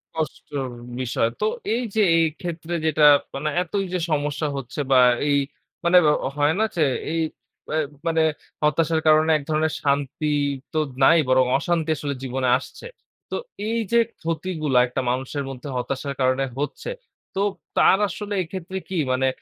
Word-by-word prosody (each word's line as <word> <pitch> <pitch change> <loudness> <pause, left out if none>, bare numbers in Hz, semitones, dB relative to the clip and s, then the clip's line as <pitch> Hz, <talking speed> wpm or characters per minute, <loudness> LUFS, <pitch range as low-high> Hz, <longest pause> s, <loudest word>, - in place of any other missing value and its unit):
কষ্টর 145 -3 -4 0.3
বিষয়। 115 -2 0
তো - - +2 0.3
এই 240 +2 0
যে, 220 - +4
এই 165 - +4 0.2
ক্ষেত্রে 170 -1 -5
যেটা, 155 -1 +4 0.3
মানে 150 +3 -1
এতই 195 +3 -2
যে 180 - 0
সমস্যা 150 +1 0
হচ্ছে 135 +2 -6
বা 130 - +7 0.3
এই 140 - +4 0.5
মানে 175 +1 +6 0.4
হয় 145 +1 +3
না 220 - +4
যে 165 - +3 0.3
এই 165 0 0 0.5
অ্যা 155 - 0 0.3
মানে 165 -1 +3 0.4
হতাশার 160 +1 +2
কারণে 155 +1 +5
এক 145 - -8
ধরনের 155 0 +1
শান্তি 145 +1 0 0.4
তো 155 - +1 0.2
নাই 165 +5 +7
বরং 130 0 +5
অশান্তি 165 +1 -1
আসলে 140 0 -3
জীবনে 130 0 -1
আসছে। 140 - -10 0.4
তো - - -1 0.3
এই 230 +1 0
যে 235 - +5 0.2
ক্ষতিগুলা 160 -4 0
একটা 125 - -2
মানুষের 130 +3 -3
মধ্যে 135 +1 -8
হতাশার 135 +3 -3
কারণে 130 +1 +2
হচ্ছে, 145 - -4 0.5
তো 195 - 0 0.4
তার 190 - +6
আসলে 205 +5 -5
এক্ষেত্রে 185 +2 -6
কী, 190 - -2 0.2
মানে 130 +1 +1
155 Hz, 155 wpm, -23 LUFS, 135-165 Hz, 0.5 s, বা